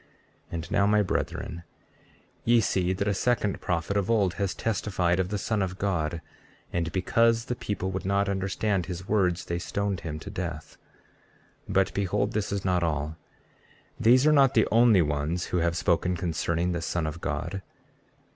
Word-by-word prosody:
33:17 - - -10
And 85 0 -5
now, 100 - +3
my 105 0 +4
brethren, 85 -2 -3 0.8
ye 120 0 +5
see 95 -4 +1
that 95 +2 -1
a 100 - +2
second 105 -1 0
prophet 85 +3 -1
of 100 0 0
old 100 -6 +2
has 100 -2 -1
testified 95 -5 0
of 95 -1 0
the 105 - -1
Son 105 +1 -1
of 95 -1 -2
God, 85 -5 -1 0.5
and 85 -1 -1
because 115 +6 +2
the 125 - -2
people 95 -4 -3
would 95 0 -3
not 100 +1 +1
understand 95 0 -1
his 90 +1 -6
words 90 -5 +1
they 85 0 -2
stoned 100 +1 -2
him 80 -2 -5
to 80 - -8
death. 85 -3 -5 0.9
33:18 - - -3
But 95 0 +3
behold, 100 +1 0
this 105 -3 -2
is 100 -1 -2
not 90 -1 +2
all; 75 -2 -1 0.8
these 125 +4 +5
are 155 - +6
not 135 -3 +5
the 110 - +4
only 115 -5 +6
ones 75 +4 -1
who - - +3
have 85 0 +1
spoken 90 +1 +1
concerning 85 +1 -1
the 85 -1 -2
Son 85 -1 -1
of 75 +2 -5
God. 100 -1 -3
95 Hz, 180 wpm, -27 LUFS, 85-105 Hz, 0.9 s, are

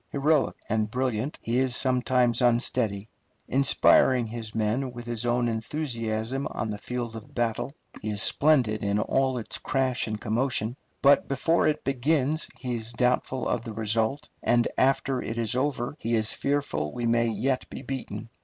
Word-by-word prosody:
Heroic 145 +1 +2
and 110 -1 0
brilliant, 125 +2 -2
he 120 +2 +1
is 130 -2 +1
sometimes 125 -2 +2
unsteady. 115 -4 +1 0.4
Inspiring 130 -2 +4
his 115 -1 -6
men 115 +5 0
with 120 -1 -8
his 120 0 -2
own 120 0 +2
enthusiasm 115 0 -2
on 110 - -3
the 105 - -5
field 120 -1 -4
of 110 -1 -10
battle, 120 +3 -1 0.3
he 110 - -3
is 105 -1 -2
splendid 130 -9 +3
in 100 0 +1
all 130 +4 +1
its 115 - -4
crash 130 -2 0
and 110 -1 -3
commotion, 115 0 -1 0.3
but 140 +1 +5
before 165 +5 +2
it 155 0 0
begins 140 +3 +1
he 125 -2 -4
is 115 0 -3
doubtful 125 +1 0
of - - 0
the 115 -2 -7
result, 115 +6 0
and 120 -1 +3
after 135 -1 +2
it 115 - -5
is 115 0 +1
over 135 0 -1
he 115 +1 0
is 110 -1 +1
fearful 140 - -1
we 120 - -3
may 115 0 +2
yet 125 +4 -1
be - - -8
beaten. 130 -3 -5
120 Hz, 165 wpm, -27 LUFS, 110-135 Hz, 0.4 s, but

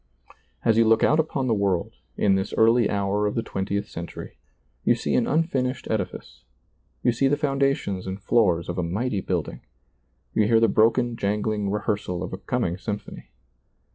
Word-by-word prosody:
As 115 -1 +4
you 115 - +5
look 110 0 +4
out 155 - +4
upon 150 -4 0
the 120 - +2
world, 100 -4 0 0.2
in 100 - +3
this 95 +1 -1
early 115 +1 +4
hour 100 +1 0
of 105 - -3
the 115 - 0
twentieth 100 +2 -3
century, 85 +1 -8 0.4
you - - +4
see - - -2
an - - +3
unfin 150 -5 +1
ished 130 - -6
edifice, 65 - -4 0.6
you 125 - +4
see 130 +4 +1
the 145 +2 +2
foundations 135 -10 0
and 95 +1 -4
floors 95 -5 +2
of 90 +1 -3
a - - 0
mighty 100 +5 -1
building, 90 -5 -3 0.7
you 105 - +2
hear 115 0 +4
the 115 - +4
broken 115 +3 +2
jangling 105 0 -1
rehearsal 100 -3 -2
of 90 - -6
a 95 - -5
coming 95 -8 -2
symphony. 105 0 -6
105 Hz, 175 wpm, -24 LUFS, 95-120 Hz, 0.7 s, you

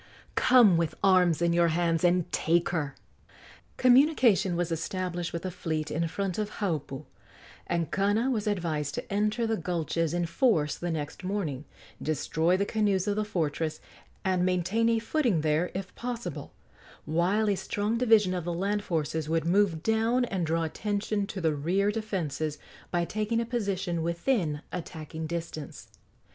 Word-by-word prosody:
Come 235 -9 +6
with 165 -2 -1
arms 180 -4 +4
in 170 0 +3
your 170 0 +4
hands 165 0 +1
and 175 -1 +3
take 170 +1 +2
her!" 150 -6 -2 0.8
Communication 250 - +4
was 175 0 -1
established 175 +1 -3
with 170 0 -4
the 185 - -3
fleet 160 -3 -3
in 165 +2 0
front 190 +2 -3
of 210 0 -3
Haupu, 155 -7 -3 0.6
and 170 -3 -1
Kana 205 +6 +1
was 215 -4 -1
advised 160 -7 -1
to - - -5
enter 210 +3 +1
the 225 -1 0
gulches 165 -1 -1
in 175 0 +1
force 165 - +2
the 175 - -4
next 155 +2 -4
morning, 175 -8 -3 0.4
destroy 160 +3 +1
the 200 - +1
canoes 200 -3 +1
of 205 - +1
the 215 - 0
fortress, 160 -5 -2 0.5
and 185 -1 +2
maintain 185 +5 +1
a 230 - +3
footing 230 - +1
there, 155 +3 +1
if 190 0 -5
possible, 240 -1 -5 0.5
while 180 +7 +1
a 205 - +3
strong 210 +4 -2
division 220 -6 +4
of 180 -2 -2
the 175 +1 -2
land 205 +3 -1
forces 160 -2 -2
would 165 -1 +1
move 175 -2 +2
down 225 +3 +2
and 185 -7 -2
draw 165 +1 +1
attention 205 +4 -2
to 200 - -5
the 160 -3 +1
rear 185 +8 +1
defences 165 -9 -3 0.3
by 175 -1 0
taking 215 +4 -1
a 230 - -1
position 195 -7 -2
within 170 - 0
attacking 160 -2 -6
distance. 165 -2 -6
180 Hz, 160 wpm, -28 LUFS, 165-210 Hz, 0.8 s, Come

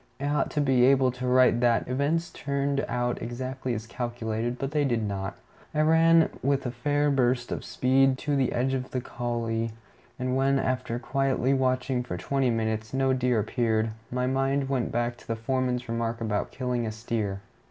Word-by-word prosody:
I 140 - -3
ought 145 +1 +1
to 150 - 0
be 130 -3 +3
able 130 -1 +4
to 125 0 -5
write 125 -2 +5
that 120 -1 +2
"events 145 +6 0
turned 140 0 -1
out 120 0 -1
exactly 130 +1 -3
as 110 +1 -5
calculated," 120 0 -3
but 135 +2 -3
they 150 -1 +1
did 120 -5 +1
not. 100 -1 -4 0.4
I 155 - +3
ran 165 +1 +5
with 140 0 +1
a 125 - -1
fair 145 +4 +1
burst 125 -2 +1
of - - -3
speed 130 +1 +2
to 145 +1 -1
the 135 -2 +1
edge 130 +2 0
of 130 -1 -2
the 130 - -2
coulée, 115 -2 -2 0.5
and 125 0 -1
when, 135 +1 +3
after 130 -3 -1
quietly 135 +1 0
watching 130 -1 +1
for 120 -8 -5
twenty 135 +6 0
minutes, 110 0 -1
no 135 0 +2
deer 125 -3 +2
appeared, 110 0 0 0.2
my 125 0 -1
mind 135 +1 0
went 130 -4 0
back 120 0 -1
to - - -18
the 115 - -1
foreman's 125 +1 -1
remark 115 0 -2
about 110 -3 -1
killing 125 -3 -2
a - - -2
steer. 110 -3 -3
125 Hz, 185 wpm, -27 LUFS, 115-135 Hz, 0.5 s, write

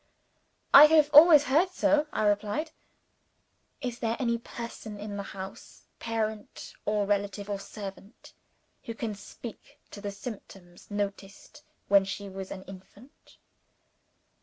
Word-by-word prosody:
"I 285 - +12
have 305 -1 +4
always 300 -1 +9
heard 300 +7 +2
so," 300 -3 +2
I - - -1
replied. 210 +10 0 1.1
"Is 245 -3 -4
there 230 0 -1
any 235 -3 0
person 230 -3 -8
in 205 0 -6
the 200 - -3
house 190 -1 -10 0.2
parent, 220 -2 -4
or 210 -1 +1
relative, 200 0 -2
or 200 - -2
servant 195 +1 -10 0.5
who 230 - -6
can 225 -2 -4
speak 205 +3 -11
to 205 - -9
the 205 - -4
symptoms 195 -4 -10
noticed 205 +6 -6 0.3
when 200 -1 +5
she 195 +1 -6
was 190 0 -7
an 190 - -8
infant?" 195 +8 -15
210 Hz, 130 wpm, -28 LUFS, 200-245 Hz, 1.1 s, I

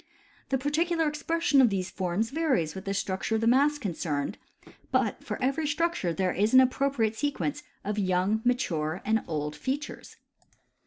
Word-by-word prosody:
The 270 - +2
particular 320 +4 +1
expression 300 -1 +2
of 245 - +5
these 190 -2 -2
forms 190 +5 -1
varies 270 - +1
with 190 - -8
the 195 - -1
structure 195 +3 -1
of 220 - 0
the - - +1
mass 280 +5 +4
concerned; 165 - -3 0.5
but - - 0
for - - -4
every 275 +4 +1
structure 330 - 0
there 185 +1 0
is 210 +6 +2
an - - +10
appropriate 260 -3 +2
sequence 290 +2 -2 0.2
of 210 +1 -2
young, 190 +3 +1
mature, 180 -10 0
and 220 0 +1
old 150 -2 -3
features. 270 - -5
225 Hz, 160 wpm, -28 LUFS, 185-290 Hz, 0.5 s, an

